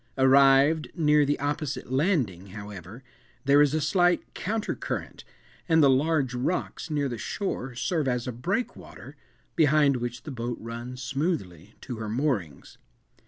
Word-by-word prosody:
Arrived 135 +3 +5
near 150 -3 +4
the 145 +1 0
opposite 145 -2 -3
landing, 130 - 0
however, 100 +3 -9 0.4
there 140 +1 +6
is 145 0 +3
a - - +1
slight 175 +3 +1
counter 215 +2 -2
current, - - -5 0.5
and 160 -1 +5
the 140 - +6
large 140 -1 +1
rocks 130 +8 -2
near 145 -2 0
the 120 -4 -5
shore 135 - -4
serve 155 +2 -1
as 125 -2 -1
a - - -1
breakwater, 185 - -5 0.4
behind 150 -3 +4
which 120 0 -5
the 150 - -7
boat 120 -1 -4
runs 120 +3 -7
smoothly 120 - -3
to 125 - -6
her 110 -1 -5
moorings. 110 - -2
135 Hz, 145 wpm, -27 LUFS, 120-155 Hz, 0.5 s, there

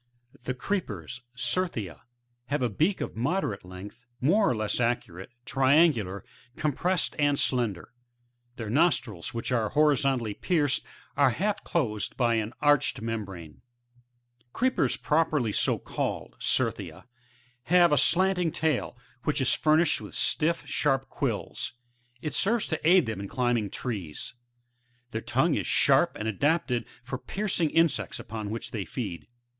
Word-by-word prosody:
] 120 - -44
4. - - -21
The 130 - -1
Creepers,— 125 - -3
C*fr/^ia, 120 - -1 0.3
— 120 0 -47
have 145 -1 -1
a 120 - 0
beak 165 - +1
of - - -4
moderate 130 - -1
Ifength, 100 +7 -11
more 195 +10 +3
or - - +1
less 110 -1 -1
arcuate, 115 -6 -1 0.2
triangular, 135 - +3 0.3
compressed 170 +5 0
and 145 -1 +3
slender; 120 -11 -1 0.6
their 110 -3 -5
nostrils, 125 - +1
which 115 +1 -3
are 115 -4 +1
horizontally 135 -6 +2
pierced, 150 - +1 0.3
are 140 -2 +5
half 200 - -1
closed 110 - -1
by 120 -2 +3
an 110 -1 -1
arched 145 -1 +3
membrane. 100 -8 -5
• - - -20
6. - - -27 0.8
The - - -33
Creepers 260 +2 +1
properly 150 -7 +1
so - - +2
called, - - -4
— - - -36
Certhia, - - -1 0.4
— 125 0 -35
have 175 -2 +6
a 150 - +4
slanting 180 +2 +3
tail, 155 -6 -1 0.3
which 150 0 +1
is 130 - +2
furnished 155 +1 +3
with - - -9
stiflf, 165 +2 +1
sharp 135 -2 0
quills; - - -3 0.5
it 150 - -3
serves 220 +8 +2
to 160 -1 -1
aid 180 -4 +6
them 110 -3 -4
in 100 - -5
climbing 120 -3 0
trees; 95 - -5 0.8
their 110 - -3
tongue - - +1
is - - -1
sharp - - +4
and 105 - -4
adapted 125 - +1 0.2
for 130 0 -5
piercing 190 -4 -1
insects 165 0 +1
upon 110 -1 -6
which 115 +2 -5
they 105 -4 -3
feed. 100 -6 -5
125 Hz, 150 wpm, -28 LUFS, 110-160 Hz, 0.8 s, have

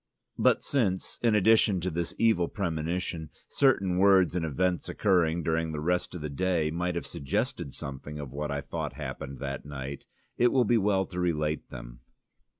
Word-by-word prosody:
But - - +3
since, 100 -10 -1
in 115 -3 +3
addition 105 -2 +4
to 90 +1 -1
this 85 +1 -3
evil 110 -7 +3
premonition, 85 -2 -3 0.2
certain 95 -10 +2
words 95 -2 +5
and 90 - 0
events 85 +4 0
occurring 85 -4 +2
during 80 0 0
the 75 - -3
rest 90 +3 -1
of 90 - -6
the 75 - -3
day 85 -1 0
might 85 +1 -1
have 85 - -3
suggested 70 0 -2
something 70 +2 -7
of 70 -4 -6
what 75 +1 -3
I 70 0 -2
thought 70 - -4
happened 70 0 -6
that 70 -1 -4
night, 70 -1 -7 0.3
it 120 0 +5
will 130 -3 +3
be 115 +2 +3
well 95 -1 +2
to 90 -1 -6
relate 75 -3 -1
them. - - -9
85 Hz, 175 wpm, -28 LUFS, 75-95 Hz, 0.3 s, words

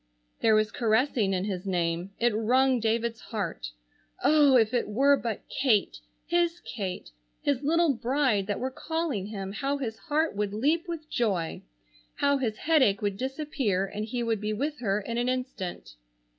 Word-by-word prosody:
There 220 -1 +4
was 215 0 +2
caressing 225 -2 +1
in 185 -1 0
his 195 -1 -4
name. 175 0 -1
It 235 -1 +3
wrung 255 +4 +3
David's 225 +1 0
heart. 180 - -4 0.5
Oh, 290 -3 +6
if 225 -1 +3
it 240 - +1
were 275 +7 +4
but 230 -6 -4
Kate, 230 -7 +1 0.3
his 345 0 +1
Kate, 190 - -5 0.3
his 280 -3 +1
little 325 +1 +3
bride 245 -4 +1
that 205 - -2
were 260 +1 -2
calling 310 - -2
him, 195 -2 -5
how 275 +7 -1
his 225 -5 -4
heart 315 -4 0
would 205 0 -2
leap 315 - +1
with 325 -3 -5
joy! 195 - -1 0.5
How 280 0 +2
his 220 -5 -1
headache 260 -12 +3
would 200 -1 0
disappear 260 -6 -1
and 210 +2 -5
he 235 +2 -3
would 225 -3 -1
be 210 0 -1
with 290 +7 -2
her 205 -3 0
in 230 +3 -3
an 245 +1 +1
instant. 255 - -4
235 Hz, 170 wpm, -28 LUFS, 205-280 Hz, 0.5 s, Oh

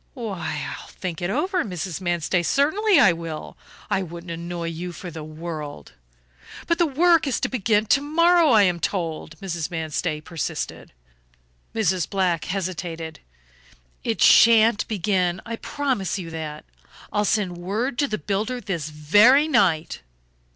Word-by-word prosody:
"Why, 205 - -4
I'll - - -8
think 180 -3 -6
it 175 - -1
over, 355 - 0
Mrs. 180 -4 -5
Manstey, 175 0 0
certainly 320 - +3
I 195 -10 +6
will. 165 -2 -7 0.3
I 195 - 0
wouldn't 170 -1 -7
annoy 170 0 -4
you 170 +2 -5
for 180 0 -8
the 160 -1 -7
world 155 - -7 0.4
" 60 +1 -16
"But 335 0 0
the 340 - +4
work 330 +2 +3
is 270 - 0
to - - +1
begin 215 -3 +1
to 275 +6 +3
morrow, 335 +2 +4
I 220 -5 +6
am 180 -3 +1
told," 165 -2 -3
Mrs. 170 -4 -3
Manstey 160 -1 -2
persisted. 160 - -5 0.8
Mrs. 190 -6 +1
Black 180 -5 0
hesitated. 175 -4 -4 0.8
"It - - 0
shan't 225 -1 +6
begin, 185 -3 0
I 230 -1 -5
promise 260 -11 -2
you 170 -3 -6
that; 155 -2 -6 0.5
I'll 210 - +2
send 195 -4 0
word 225 +8 -2
to 285 - +2
the 215 - -2
builder 210 +9 -2
this 170 -9 -4
very 205 - +5
night." 170 - +1
185 Hz, 150 wpm, -23 LUFS, 165-230 Hz, 0.8 s, I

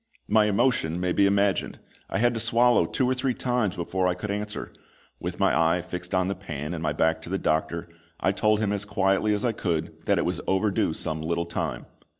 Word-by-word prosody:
My 110 -1 +4
emotion 105 -6 +1
may 90 0 0
be 100 +2 +4
imagined! 100 0 +1 0.3
I - - -1
had 120 +2 +3
to 115 - -3
swallow 120 +1 +3
two 130 - 0
or 130 - +2
three 130 -1 -1
times 120 -7 0
before 90 +2 -1
I 90 - +1
could 100 +3 -4
answer. 105 +1 -4 0.5
With - - -5
my - - +3
eye 80 +2 +2
fixed 90 0 -4
on 95 0 +2
the 100 - 0
pan 80 -5 -6
and 85 - -4
my 80 - 0
back 80 +2 +1
to 85 - -9
the 95 - 0
doctor, 80 +1 -1 0.3
I 95 - +2
told 105 +1 +2
him 105 -2 +1
as 100 0 0
quietly 100 0 +1
as 105 - -2
I 120 - +2
could 85 -7 -3
that - - +3
it - - +1
was - - -2
overdue 95 +1 +1
some 80 0 -3
little 85 +2 -1
time. 85 -7 -3
95 Hz, 220 wpm, -26 LUFS, 85-105 Hz, 0.5 s, My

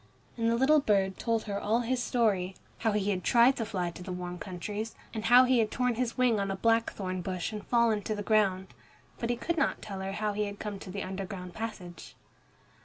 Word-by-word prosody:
And 230 -1 +1
the 230 - +2
little 275 +5 +5
bird 195 -7 +1
told 230 -2 0
her 200 -2 -3
all 225 +3 +1
his 245 +1 -1
story, 200 -7 +1 0.2
how 225 -2 +1
he 205 -1 +1
had 185 -2 -2
tried 240 +3 +5
to 225 - -1
fly 180 -5 -2
to 175 - -11
the 185 +1 -6
warm 180 0 -5
countries, 205 +5 -5 0.2
and 220 -1 -4
how 245 +2 +8
he 255 -1 +3
had 220 -2 +2
torn 250 +1 0
his 235 0 -2
wing 245 -4 +3
on 200 0 -1
a 195 - -1
blackthorn 200 -4 0
bush 185 +2 -3
and 210 -1 -5
fallen 235 -3 +3
to 215 - -1
the 205 - -4
ground. 195 -3 +2 0.5
But 235 - -2
he 240 - +2
could 340 +7 -2
not - - +1
tell 195 -3 -7
her 190 0 -4
how 210 0 -1
he 210 +1 0
had 200 0 -6
come 205 -2 -5
to 190 - -10
the 195 +1 -4
underground 185 -1 -6
passage. 190 -6 -7
210 Hz, 230 wpm, -30 LUFS, 190-230 Hz, 0.5 s, how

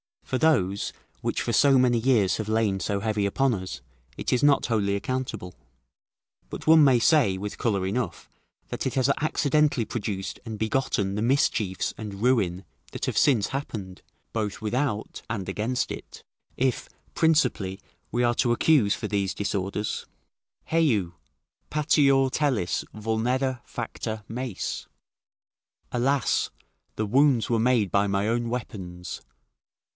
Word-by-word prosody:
For 130 - -2
those 100 - +2 0.3
which - - -1
for - - -1
so 135 +4 +5
many 125 -2 +3
years 110 -6 +3
have 110 - -4
lain 110 -3 +1
so 100 +2 -1
heavy 105 -1 0
upon 130 +6 +2
us, 95 -3 -5 0.4
it - - -2
is 125 - +2
not 145 -1 +4
wholly 100 -4 +1
accountable; 110 -5 -3 1.0
but - - -7
one 160 -1 +7
may 130 -3 +5
say, 120 - +4
with 100 +2 -5
colour 100 -5 0
enough, 100 -3 -3 0.4
that - - -3
it 130 - -2
has 130 0 +2
accidentally 150 -4 +2
produced 100 -4 -4
and 110 -2 -5
begotten 110 -3 0
the 105 - -2
mischiefs 115 -6 +1
and 105 -1 -6
ruin 100 -8 +2 0.3
that - - -3
have - - -2
since 120 -8 +4
happened, 105 -9 -5 0.3
both 105 -3 -2
without 110 0 -2
and 100 -4 -3
against 110 +6 -1
it; - - -9 0.3
it, 130 -1 0 0.3
principally, 150 - +2 0.3
we 120 +2 0
are 120 0 +3
to 120 0 +2
accuse 120 -5 +3
for - - -5
these 100 -2 0
disorders: 100 0 -2 0.6
"Heu! 120 - +2 0.6
patior 140 -3 +3
telis 130 - 0
vulnera 120 +4 -1
facta 110 -2 -5
meis." 120 -3 -4 1.0
["Alas! 135 +3 +1 0.5
The 110 - -1
wounds 130 0 +3
were 115 -1 +2
made 115 -5 +2
by 100 +2 +3
my 100 +2 0
own 120 0 0
weapons." 95 -7 -6
115 Hz, 140 wpm, -26 LUFS, 100-130 Hz, 1.0 s, one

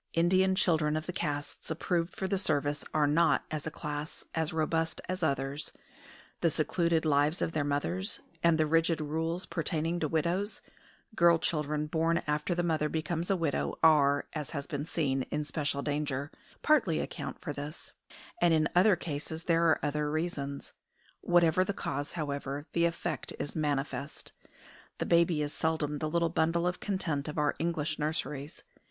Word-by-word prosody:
Indian 185 +3 +3
children 155 -4 +2
of 155 - -4
the 180 - -4
castes 145 -3 -4
approved 165 +2 -1
for 190 - -2
the 195 0 0
service 145 -5 0
are 155 -1 +3
not, 155 +4 +3
as 155 0 -3
a - - 0
class, 150 0 -5
as 160 0 0
robust 160 0 0
as 185 0 -3
others; 140 -1 -1 0.7
the 170 - +3
secluded 165 +1 +1
lives 150 +2 +3
of - - 0
their 155 -2 0
mothers, 160 +8 -1 0.2
and 170 -1 +4
the 155 - +3
rigid 165 +1 +2
rules 160 +4 -1
pertaining 165 0 -1
to 155 - 0
widows 170 +7 -1 0.5
(girl 170 -2 +6
children 150 -2 -1
born 165 +2 +1
after 150 +4 0
the 175 - 0
mother 155 -3 +1
becomes 160 +2 -2
a 195 - +4
widow 165 -5 -1
are, 145 -3 +5
as 150 -3 -4
has 140 -3 -4
been 145 -1 -4
seen, 135 -6 0
in 150 0 -1
special 145 -1 -2
danger), 145 -1 -2 0.3
partly 230 - +3
account 145 -4 -5
for 155 -5 -4
this; 145 +3 -7 0.5
and 165 -1 +5
in 155 -1 +3
other 190 +2 +6
cases 160 0 -5
there 170 0 +3
are 160 - +4
other 150 0 0
reasons. 150 -3 -3 0.5
Whatever 175 0 +4
the 200 - -2
cause, 145 -6 -3
however, 145 -2 -3
the 170 0 +3
effect 170 -3 -2
is 145 - -4
manifest. 140 -2 -2 0.7
The - - -2
baby 170 -2 +3
is 145 - -3
seldom 155 -2 -1
the 155 - -1
little 170 +1 +1
bundle 165 +1 +1
of 180 0 -1
content 165 -8 -2
of 150 - -5
our 150 -1 +2
English 155 -2 -1
nurseries. 150 -1 -3
155 Hz, 170 wpm, -31 LUFS, 145-170 Hz, 0.7 s, girl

